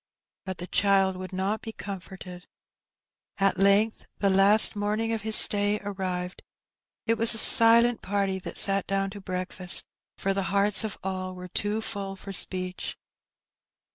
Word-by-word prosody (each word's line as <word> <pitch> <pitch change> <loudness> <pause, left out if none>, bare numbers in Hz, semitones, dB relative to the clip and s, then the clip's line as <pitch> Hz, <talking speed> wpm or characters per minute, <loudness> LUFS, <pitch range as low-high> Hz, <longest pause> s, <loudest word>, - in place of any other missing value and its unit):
But 190 -1 -6
the 175 - -7
child 195 0 +1
would 185 +1 -9
not 195 +3 -3
be 225 - -8
comforted. 190 -3 -10 0.9
At 195 -1 0
length 200 +3 +1
the 200 -1 0
last 200 +4 +6
morning 210 +2 -2
of 225 - -4
his 220 +1 +5
stay 205 0 +4
arrived. 185 -2 -6 0.6
It 230 -1 -1
was 230 0 +3
a - - -4
silent 230 +1 +5
party 195 -1 -2
that - - -6
sat 195 -1 +2
down 195 0 -2
to 200 0 -11
breakfast, 185 -1 +1 0.3
for 195 - -2
the 195 - -2
hearts 200 +2 +1
of 220 - -6
all 185 -1 -6
were 180 0 -11
too 210 +4 -3
full 200 -3 -5
for 195 +1 -11
speech. 185 -1 -2
195 Hz, 155 wpm, -25 LUFS, 190-210 Hz, 0.9 s, last